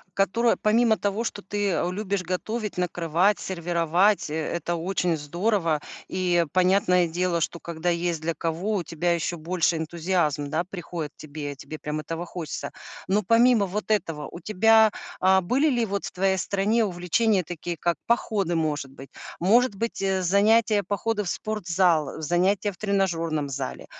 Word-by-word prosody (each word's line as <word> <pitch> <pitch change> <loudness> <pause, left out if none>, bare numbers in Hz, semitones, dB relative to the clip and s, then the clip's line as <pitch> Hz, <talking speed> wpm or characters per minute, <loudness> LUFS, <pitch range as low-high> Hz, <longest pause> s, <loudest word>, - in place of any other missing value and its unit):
которое 230 +5 +2
помимо 220 +1 +3
того, 205 +3 -1
что 205 -3 -5
ты, 205 0 -1
э, 175 - 0
любишь 200 -1 -2
готовить, 210 +4 -3
накрывать, 175 +2 +1
сервировать- 175 +1 +1
э - - -2
это 170 +2 -2
очень 175 0 0
здорово. 170 +1 0 0.3
И 175 -2 +1
понятное 180 -1 +3
дело, 175 +1 0
что 170 +1 -2
когда 170 +1 -3
есть 170 -1 -1
для 165 +1 -1
кого, 175 +7 -2
у 175 - -2
тебя 170 +2 0
еще 170 +1 -2
больше 170 0 0
энтузиазма, 160 -3 -1
да, 160 +4 -1
приходит 170 -4 -6
тебе 145 -1 -6
тебе 155 +3 -8
прям 150 0 -4
этого 165 +3 -5
хочется. 170 -3 -6 0.4
Но 205 +3 +2
помимо 230 0 +4
вот 210 +3 -3
этого, 165 -7 -1
у 170 - -8
тебя, 220 +2 +5 0.3
а, 190 0 +4
были 270 - +2
ли 240 -3 +1
вот 200 -1 -3
в - - -5
твоей 190 +1 +1
стране 205 +5 +1
увлечения 185 +2 +1
такие, 170 +1 -5
как 170 -1 0
походы, 205 -7 +1
может 150 -4 -1
быть? 135 0 -12 0.3
Может 220 +5 +3
быть, 230 0 -3
э, 190 -1 0
занятия- 210 +3 +4
походы 210 +1 -1
в 175 - -4
спортзал, 175 -8 0
э, - - -7
занятия 185 +5 +1
в 180 - -17
тренажёрном 165 -8 0
зале? 135 -1 -5
180 Hz, 165 wpm, -25 LUFS, 165-205 Hz, 0.4 s, тебя